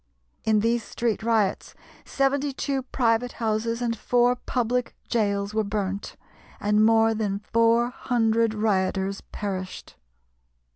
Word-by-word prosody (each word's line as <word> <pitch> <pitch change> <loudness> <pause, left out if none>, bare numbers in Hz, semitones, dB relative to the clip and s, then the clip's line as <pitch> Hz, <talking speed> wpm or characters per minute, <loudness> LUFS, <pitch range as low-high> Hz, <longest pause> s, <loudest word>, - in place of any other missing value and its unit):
In 215 -1 +3
these 230 +1 +1
street 230 -2 -2
riots 220 -3 0 0.3
seventy 275 +1 0
two 275 0 -2
private 245 -1 0
houses 230 +1 -1
and 230 -1 0
four 245 +2 +2
public 245 0 -2 0.2
gaols 200 -3 0
were 220 0 +1
burnt, 200 -1 -3 0.4
and 210 +1 +2
more 225 0 +4
than 210 -3 -1
four 230 +3 +2
hundred 230 -3 +1
rioters 195 -2 0
perished. 190 -2 -5
225 Hz, 115 wpm, -25 LUFS, 210-240 Hz, 0.4 s, more